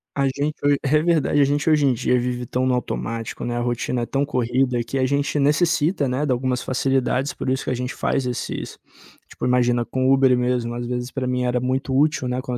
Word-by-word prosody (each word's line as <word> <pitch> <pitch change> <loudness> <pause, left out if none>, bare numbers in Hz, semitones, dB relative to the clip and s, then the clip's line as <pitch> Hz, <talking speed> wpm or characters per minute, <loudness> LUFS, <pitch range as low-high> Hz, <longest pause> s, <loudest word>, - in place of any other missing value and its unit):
A 140 - +1
gente 145 +3 -2
ho 145 0 +4
É 150 +2 +3
verdade, 155 -3 +2
a - - +7
gente 145 +3 0
hoje 150 -3 +4
em 130 - +3
dia 125 +2 +1
vive 125 0 -3
tão 130 +2 -1
no 125 - +2
automático, 115 -2 -4
né, 120 0 -2
a - - -1
rotina 120 0 -1
é 120 - -1
tão 140 +3 -1
corrida 125 -2 0
que 135 +4 -3
a 130 - +2
gente 140 +1 0
necessita, 150 +1 +2
né, 130 +4 -1
de 145 - 0
algumas 125 0 0
facilidades, 135 +1 0
por - - -4
isso 130 0 0
que - - -1
a - - +1
gente 125 +1 -4
faz 135 - -1
esses 125 - -4 0.5
Tipo, - - -6
imagina, 120 -1 +2
com 130 +2 -2
o 135 - +5
Uber 130 -2 +4
mesmo, 125 -1 -1
às 120 0 -4
vezes 125 +1 -3
pra 135 -1 -4
mim 125 0 -1
era 125 0 +1
muito 130 +1 -1
útil, 150 -3 +2
né, 125 0 -2
quando 125 -2 -3
130 Hz, 240 wpm, -22 LUFS, 125-140 Hz, 0.5 s, a